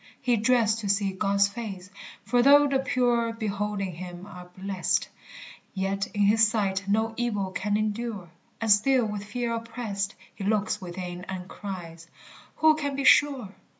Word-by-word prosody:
He 245 Hz, -2 st, +2 dB
dreads 225 Hz, 0 st, +3 dB
to 210 Hz, -3 st, -4 dB
see 200 Hz, 0 st, +1 dB
God's 200 Hz, +1 st, +2 dB
face, 200 Hz, -3 st, -7 dB, 0.3 s
for 245 Hz, -1 st, +3 dB
though 285 Hz, +3 st, +7 dB
the 275 Hz, -1 st, +1 dB
pure 245 Hz, -3 st, +1 dB
Beholding 205 Hz, -3 st, -3 dB
him 175 Hz, +1 st, -8 dB
are 180 Hz, -3 st, -11 dB
blest, 190 Hz, -1 st, -1 dB, 0.7 s
Yet 195 Hz, +1 st, -1 dB
in 205 Hz, -, 0 dB
his 220 Hz, +2 st, +5 dB
sight 200 Hz, -3 st, -1 dB
no 220 Hz, +2 st, +1 dB
evil 210 Hz, -6 st, -1 dB
can 205 Hz, +2 st, -1 dB
endure; 215 Hz, -4 st, -3 dB, 0.3 s
And 225 Hz, -2 st, +1 dB
still 245 Hz, +4 st, +4 dB
with 210 Hz, -1 st, -4 dB
fear 235 Hz, +3 st, -3 dB
oppressed 225 Hz, -3 st, -4 dB, 0.2 s
He 200 Hz, -, -8 dB
looks 210 Hz, 0 st, 0 dB
within 180 Hz, 0 st, -6 dB
and 185 Hz, -1 st, -6 dB
cries, 170 Hz, -5 st, -8 dB, 0.5 s
"Who 315 Hz, 0 st, +5 dB
can 285 Hz, -3 st, -3 dB
be 275 Hz, -, -2 dB
sure?" 270 Hz, -7 st, +4 dB
210 Hz, 155 wpm, -26 LUFS, 195-235 Hz, 0.7 s, though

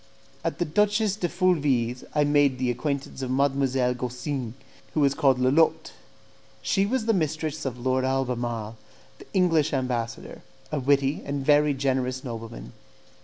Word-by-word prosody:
At -, -, -2 dB
the -, -, 0 dB
Duchess 210 Hz, +4 st, +2 dB
de 180 Hz, -5 st, -2 dB
Fulvie's 145 Hz, -10 st, +1 dB
I 150 Hz, -, +4 dB
made 145 Hz, -2 st, +3 dB
the 125 Hz, -1 st, 0 dB
acquaintance 140 Hz, +2 st, -3 dB
of 130 Hz, -, -3 dB
Mdlle. 135 Hz, -2 st, +1 dB
Gaussin, 125 Hz, 0 st, -4 dB, 0.4 s
who -, -, +2 dB
was 140 Hz, -1 st, +4 dB
called 135 Hz, -2 st, +3 dB
Lolotte. 155 Hz, +5 st, +2 dB, 0.7 s
She 195 Hz, 0 st, +1 dB
was 250 Hz, 0 st, -1 dB
the 225 Hz, -, +3 dB
mistress 155 Hz, -3 st, -2 dB
of 125 Hz, -2 st, -3 dB
Lord 130 Hz, +1 st, 0 dB
Albemarle, 120 Hz, -4 st, -2 dB, 0.4 s
the -, -, -13 dB
English 165 Hz, -5 st, +3 dB
ambassador, 125 Hz, -3 st, -3 dB, 0.3 s
a 150 Hz, -, -1 dB
witty 140 Hz, +2 st, +2 dB
and 140 Hz, -1 st, -3 dB
very 150 Hz, 0 st, +4 dB
generous 130 Hz, -1 st, -1 dB
nobleman. 115 Hz, -, -7 dB
135 Hz, 145 wpm, -26 LUFS, 125-155 Hz, 0.7 s, I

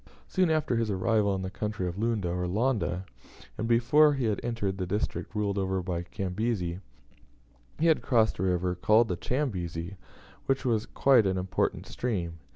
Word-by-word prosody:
Soon 185 Hz, -3 st, +2 dB
after 155 Hz, -6 st, +1 dB
his 115 Hz, -2 st, 0 dB
arrival 100 Hz, +1 st, +1 dB
in 95 Hz, -, -3 dB
the 95 Hz, -, -4 dB
country 105 Hz, -2 st, -3 dB
of 85 Hz, -, -4 dB
Lunda, 110 Hz, -5 st, 0 dB
or 90 Hz, +1 st, -2 dB
Londa, 100 Hz, -, 0 dB, 0.5 s
and 110 Hz, -, -3 dB
before 140 Hz, +6 st, +5 dB
he 135 Hz, -3 st, -1 dB
had 105 Hz, -3 st, 0 dB
entered 105 Hz, -5 st, -2 dB
the 90 Hz, -, -2 dB
district 105 Hz, +3 st, -3 dB
ruled 100 Hz, -1 st, 0 dB
over 95 Hz, -1 st, -1 dB
by 85 Hz, -2 st, -2 dB
Cazembe, 95 Hz, 0 st, -3 dB, 1.0 s
he 160 Hz, -, 0 dB
had 160 Hz, -2 st, +4 dB
crossed 115 Hz, -7 st, +2 dB
a -, -, -1 dB
river 90 Hz, -1 st, +1 dB
called 110 Hz, +5 st, +3 dB
the 90 Hz, -, 0 dB
Chambezi, 90 Hz, -, -3 dB, 0.5 s
which 135 Hz, 0 st, 0 dB
was 115 Hz, -3 st, +1 dB
quite 125 Hz, -7 st, +4 dB
an 95 Hz, 0 st, 0 dB
important 90 Hz, 0 st, -1 dB
stream. 85 Hz, -9 st, -3 dB
105 Hz, 170 wpm, -28 LUFS, 90-115 Hz, 1.0 s, before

